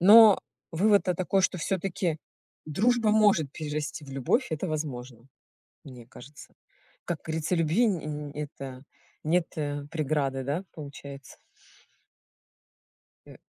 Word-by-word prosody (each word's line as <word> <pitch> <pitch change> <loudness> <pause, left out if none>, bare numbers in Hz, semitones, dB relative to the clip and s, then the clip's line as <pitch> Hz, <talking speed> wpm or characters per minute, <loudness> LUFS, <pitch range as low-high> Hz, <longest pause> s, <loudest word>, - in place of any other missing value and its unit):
Но 210 +2 +9 0.3
вывод-то 195 +1 +3
такой, 185 +2 +1
что 185 - +1
всё-таки 175 -2 -1 0.5
дружба 220 +8 +2
может 205 -10 +4
перерасти 150 -1 -4
в 135 - -11
любовь- 135 - +1
это 160 +3 -2
возможно. 130 -6 -5 0.6
Мне 125 -4 -11
кажется. 145 +4 -14 0.5
Как 170 -3 -3
говорится, 160 +2 -1
любви 165 +9 +3
н 190 -5 +1
э, - - -11
н 150 -1 -5
это 135 -3 -7 0.4
нет, 170 +2 +2
э, 145 -1 -3
преграды, 140 -4 -1
да, 150 +8 -2
получается? 140 -2 -10 1.9
Э - - -13
155 Hz, 120 wpm, -28 LUFS, 140-185 Hz, 1.9 s, Но